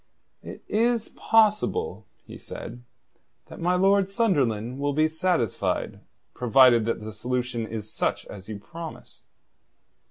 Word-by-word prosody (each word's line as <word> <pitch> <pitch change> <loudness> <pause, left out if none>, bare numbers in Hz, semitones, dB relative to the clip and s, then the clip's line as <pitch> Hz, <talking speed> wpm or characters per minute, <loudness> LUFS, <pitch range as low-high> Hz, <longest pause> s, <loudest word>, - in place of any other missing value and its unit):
"It - - -10
is 230 +1 +1
possible," 225 - +1 0.2
he - - -11
said, 120 - -8 0.7
"that - - -10
my 180 +2 +2
Lord 195 +1 +3
Sunderland 130 - 0
will 145 0 0
be 155 +2 +3
satisfied, 160 - -1 0.3
provided 125 -2 +5
that 115 -1 -2
the 110 0 -7
solution 120 +1 -3
is 110 -1 -7
such - - -1
as 95 0 -11
you 105 - -5
promise." 165 +10 -10
135 Hz, 125 wpm, -25 LUFS, 115-195 Hz, 0.7 s, provided